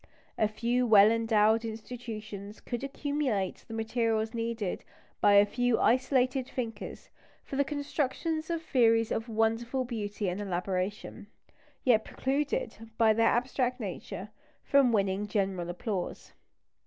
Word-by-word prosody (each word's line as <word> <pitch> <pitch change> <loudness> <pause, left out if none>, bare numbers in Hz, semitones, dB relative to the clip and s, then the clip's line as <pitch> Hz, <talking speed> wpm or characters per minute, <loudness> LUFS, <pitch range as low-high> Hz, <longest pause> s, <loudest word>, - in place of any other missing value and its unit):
A 215 - +2
few 240 +3 0
well 210 -1 +7
endowed 225 -1 +3
institutions 215 -2 -7
could 240 +1 -5
accumulate 275 -8 -2
the 225 - -6
materials 225 0 0
needed 230 -4 -3 0.4
by 205 - +6
a 200 0 +7
few 245 +2 +1
isolated 255 +1 +2
thinkers 225 -4 -6 0.3
for - - -7
the 280 - +3
construction 290 +2 -2
of 335 -1 -2
theories 230 -6 +3
of 225 +2 -2
wonderful 225 +3 0
beauty 210 -4 -3
and 180 +3 -2
elaboration, 190 +3 -3 0.6
yet 225 -4 +4
precluded, 280 - -2
by 225 -1 +5
their 225 +1 +3
abstract 250 +1 0
nature, 200 -1 -6 0.3
from 275 -4 +4
winning 200 -1 +1
general 190 -4 -1
applause. 180 +1 -4
225 Hz, 125 wpm, -30 LUFS, 210-250 Hz, 0.6 s, well